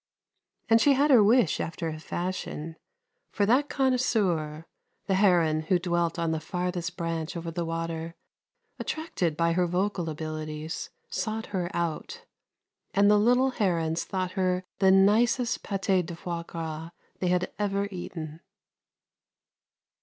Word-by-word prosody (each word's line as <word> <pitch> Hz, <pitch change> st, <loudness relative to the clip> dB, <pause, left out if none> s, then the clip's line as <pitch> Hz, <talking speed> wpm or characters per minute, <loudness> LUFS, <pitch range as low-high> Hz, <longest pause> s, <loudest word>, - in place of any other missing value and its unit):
And 225 Hz, 0 st, +5 dB
she 285 Hz, +4 st, +6 dB
had 285 Hz, +2 st, +3 dB
her 240 Hz, -5 st, +8 dB
wish 220 Hz, -4 st, +4 dB
after 165 Hz, 0 st, -3 dB
a 155 Hz, -1 st, -4 dB
fashion, 165 Hz, -2 st, -4 dB, 0.5 s
for 205 Hz, -, +1 dB
that 260 Hz, +7 st, +3 dB
connoisseur, 200 Hz, -, +1 dB, 0.4 s
the 195 Hz, -, 0 dB
heron 175 Hz, -5 st, +4 dB
who 185 Hz, -, +5 dB
dwelt 175 Hz, -1 st, 0 dB
on 165 Hz, -1 st, 0 dB
the 160 Hz, -, -1 dB
farthest 180 Hz, +1 st, -3 dB
branch 165 Hz, 0 st, -3 dB
over 165 Hz, 0 st, -5 dB
the 170 Hz, +1 st, -2 dB
water, 165 Hz, 0 st, -4 dB, 0.6 s
attracted 190 Hz, -, -2 dB
by 170 Hz, 0 st, +2 dB
her 180 Hz, +1 st, +2 dB
vocal 180 Hz, -1 st, -1 dB
abilities, 155 Hz, 0 st, -5 dB, 0.2 s
sought 220 Hz, 0 st, -2 dB
her 180 Hz, -2 st, -1 dB
out, 170 Hz, -, -3 dB, 0.7 s
and 200 Hz, +1 st, +5 dB
the 210 Hz, -, +5 dB
little 250 Hz, +4 st, +4 dB
herons 170 Hz, -7 st, 0 dB
thought 185 Hz, -1 st, -2 dB
her 185 Hz, -1 st, 0 dB, 0.2 s
the 190 Hz, -, +5 dB
nicest 220 Hz, +6 st, +4 dB
paté 195 Hz, -2 st, 0 dB
de 170 Hz, 0 st, -7 dB
foie 170 Hz, 0 st, -4 dB
gras 160 Hz, -1 st, -5 dB, 0.3 s
they 185 Hz, -, 0 dB
had 180 Hz, 0 st, +1 dB
ever 200 Hz, -1 st, 0 dB
eaten. 165 Hz, -4 st, -6 dB
180 Hz, 140 wpm, -27 LUFS, 165-205 Hz, 0.7 s, her